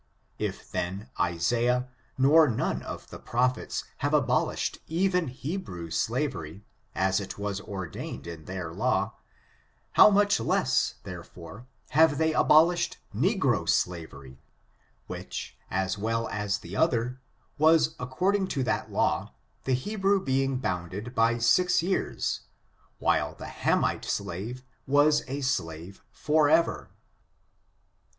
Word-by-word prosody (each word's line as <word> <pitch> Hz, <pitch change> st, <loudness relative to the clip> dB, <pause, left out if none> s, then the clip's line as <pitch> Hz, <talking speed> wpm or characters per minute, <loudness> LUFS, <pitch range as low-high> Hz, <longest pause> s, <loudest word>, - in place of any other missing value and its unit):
If, -, -, -4 dB
then, 95 Hz, +7 st, -4 dB
Isaiah, 120 Hz, +9 st, +1 dB, 0.3 s
nor 150 Hz, +4 st, +6 dB
none 115 Hz, -, -1 dB
of -, -, -8 dB
the -, -, -8 dB
prophets 125 Hz, +2 st, -1 dB
have -, -, +1 dB
abolished -, -, 0 dB
even 180 Hz, 0 st, +1 dB
Hebrew 125 Hz, -, -5 dB
slavery, 105 Hz, -, -2 dB, 0.3 s
as 95 Hz, +1 st, +2 dB
it 100 Hz, -, -6 dB
was 100 Hz, -1 st, -3 dB
ordained 95 Hz, -5 st, -6 dB
in 85 Hz, -2 st, -8 dB
their 90 Hz, -3 st, -5 dB
law, 120 Hz, +8 st, 0 dB, 0.8 s
how -, -, +8 dB
much 205 Hz, -, +3 dB
less, 115 Hz, -, +1 dB
therefore, 90 Hz, +5 st, -10 dB, 0.2 s
have 155 Hz, 0 st, +4 dB
they 160 Hz, +1 st, +2 dB
abolished 170 Hz, +4 st, +4 dB, 0.2 s
negro 135 Hz, -, +1 dB
slav 85 Hz, -3 st, 0 dB
ery, 65 Hz, -1 st, -13 dB, 0.7 s
which, -, -, -6 dB
as 95 Hz, +2 st, -1 dB
well 115 Hz, +2 st, -1 dB
as 105 Hz, -1 st, -1 dB
the 95 Hz, -1 st, -9 dB
other, 125 Hz, -2 st, +1 dB, 0.4 s
was 160 Hz, +1 st, +5 dB
according 185 Hz, +11 st, 0 dB
to 140 Hz, -7 st, -1 dB
that -, -, -1 dB
law, -, -, 0 dB, 0.3 s
the 130 Hz, -, +2 dB
Hebrew 195 Hz, +8 st, +1 dB
being 135 Hz, -3 st, 0 dB
bounded 95 Hz, +1 st, -4 dB
by 115 Hz, 0 st, +3 dB
six 165 Hz, +10 st, +3 dB
years, 190 Hz, +2 st, -1 dB, 0.6 s
while -, -, +1 dB
the -, -, -9 dB
Hamite -, -, 0 dB
slave 115 Hz, +9 st, -4 dB, 0.2 s
was 145 Hz, +2 st, +4 dB
a 140 Hz, +2 st, -4 dB
slave 85 Hz, -, -3 dB
forever. 155 Hz, +2 st, +2 dB
125 Hz, 120 wpm, -28 LUFS, 95-155 Hz, 0.8 s, how